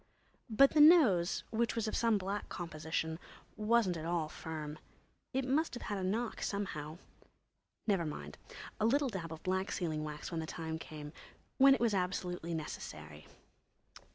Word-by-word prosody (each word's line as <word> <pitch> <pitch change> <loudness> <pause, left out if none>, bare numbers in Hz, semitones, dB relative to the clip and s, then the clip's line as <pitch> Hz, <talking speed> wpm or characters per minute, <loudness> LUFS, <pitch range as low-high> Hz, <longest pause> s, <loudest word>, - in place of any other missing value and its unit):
But 275 +5 +6
the 305 - +5
nose, 255 - +6
which 230 +1 0
was 225 -1 -1
of - - -2
some 230 -2 +3
black 200 +2 -3
composition, 160 -1 -3 0.4
wasn't 215 -4 +2
at 155 - -6
all 170 -3 0
firm. 155 -2 -6 0.5
It 265 0 0
must 285 +3 +1
have 240 - -7
had 205 -2 -3
a - - -3
knock, 220 +5 -1
somehow. 160 -6 -3 0.9
Never 190 -6 +1
mind—a 75 - -6
little 280 +3 +2
dab 175 -7 -5
of 160 - -8
black 190 +1 0
sealing 155 -4 -2
wax 150 +2 -6
when 165 - -2
the 160 - -4
time 160 -1 -4
came—when 160 - +1
it - - -4
was 235 -3 +2
absolutely 180 -2 -2
necessary.... 75 - -7
180 Hz, 155 wpm, -34 LUFS, 160-225 Hz, 0.9 s, But